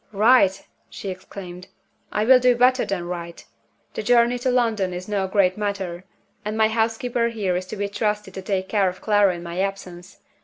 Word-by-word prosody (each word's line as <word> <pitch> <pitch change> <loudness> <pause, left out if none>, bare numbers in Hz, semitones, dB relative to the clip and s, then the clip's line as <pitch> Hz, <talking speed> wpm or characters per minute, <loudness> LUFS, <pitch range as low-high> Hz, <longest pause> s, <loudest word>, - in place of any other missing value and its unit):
"Write!" 210 -2 +4 0.2
she 195 - -7
exclaimed. 185 -1 -9 0.4
"I 210 - 0
will 255 +1 +7
do 250 0 +4
better 255 +2 +3
than 185 -3 -3
write. 170 -1 -7 0.5
The - - -3
journey 240 +2 +3
to 255 - 0
London 225 -7 +1
is 180 +1 -7
no 200 -2 -1
great 190 0 +2
matter 190 -4 -3 0.4
and 215 +1 -4
my 220 0 +4
housekeeper 230 +2 0
here 205 -6 -2
is 185 +1 -3
to - - -6
be 205 0 -1
trusted 210 -1 -2
to 190 - -6
take 190 -1 -2
care 200 -3 +2
of 180 - -9
Clara 205 -3 +3
in 170 - -8
my 170 +1 -5
absence. 190 -2 -5
200 Hz, 190 wpm, -23 LUFS, 185-225 Hz, 0.5 s, will